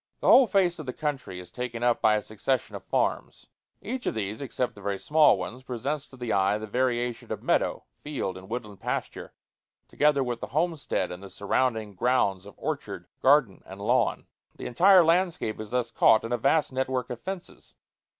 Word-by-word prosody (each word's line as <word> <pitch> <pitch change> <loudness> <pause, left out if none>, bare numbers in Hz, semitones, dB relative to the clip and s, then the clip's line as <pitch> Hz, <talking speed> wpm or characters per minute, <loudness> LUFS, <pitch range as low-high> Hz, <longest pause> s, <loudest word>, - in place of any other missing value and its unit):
The - - -2
whole 265 -2 +8
face 180 -4 +2
of 155 - -7
the 125 - -3
country 145 -11 -4
is 90 - -12
taken 120 -1 -5
up 120 -1 +2
by 110 -1 +4
a 105 - -1
succession 115 +4 -2
of - - -7
farms. - - -2 0.4
Each 245 +5 -4
of - - -1
these, 105 +1 -3
except 130 -2 -2
the 105 - -14
very 100 0 -2
small 150 -1 +4
ones, 110 +7 -6
presents 135 +4 -4
to 130 - -15
the 120 -2 -2
eye 100 +1 +2
the 110 - -6
variation 120 +1 -1
of - - -4
meadow, - - +1
field, 145 -10 -4
and 95 +1 -11
woodland 110 -4 -6
pasture, - - -4 0.6
together 145 -2 +2
with 120 -2 -4
the - - -4
homestead 160 - -1
and 90 +1 -8
the 100 - -10
surrounding 110 0 -1
grounds 100 -3 +1
of 100 - -13
orchard, - - -4 0.2
garden, 135 -7 +4
and 95 +1 -11
lawn. 100 - +1 0.3
The - - -9
entire 180 +8 +6
landscape 170 -9 +1
is 110 -1 -6
thus 120 -1 -1
caught 110 - +5
in 115 - -5
a 120 - +1
vast 150 +2 +2
net 130 0 -1
work 125 -2 -2
of 120 - -6
fences. 190 -2 -8
125 Hz, 200 wpm, -27 LUFS, 105-145 Hz, 0.6 s, whole